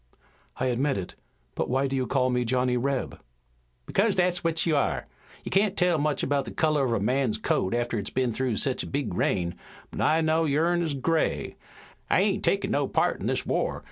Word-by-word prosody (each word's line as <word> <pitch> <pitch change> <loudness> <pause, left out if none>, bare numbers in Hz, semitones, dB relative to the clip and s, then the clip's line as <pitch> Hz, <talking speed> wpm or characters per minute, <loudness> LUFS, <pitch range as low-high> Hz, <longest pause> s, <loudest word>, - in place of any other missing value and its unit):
"I 130 - -1
admit 130 +2 +1
it. 95 - -5 0.4
But - - -2
why 135 +2 +1
do 135 0 -2
you 130 -2 -1
call 130 -2 +1
me 125 0 +1
Johnny 125 +1 +1
Reb?" 135 +1 -2 0.6
"Because 200 - +1
that's 180 -1 +1
what 165 -1 +1
you 160 -3 +2
are. 140 - 0 0.4
You - - -6
can't 200 +1 +2
tell 175 -3 +3
much 150 0 0
about 140 -1 0
the 115 - -7
color 155 -3 +1
of 120 - 0
a 115 - +1
man's 125 +1 +1
coat 100 -1 0
after 120 -2 -1
it's 100 - -4
been 130 -2 0
through 130 -1 -1
sech 130 +4 0
a - - -5
big 140 -7 -2
rain, 85 -1 0 0.4
but - - -4
I 160 +1 +3
know 160 +1 +2
yourn 165 +4 +2
is 160 -4 -1
gray. 160 +4 0 0.5
I - - +4
ain't - - +1
takin' - - +1
no - - +1
part - - +1
in - - -2
this - - -1
war. - - -1
135 Hz, 210 wpm, -26 LUFS, 125-160 Hz, 0.6 s, I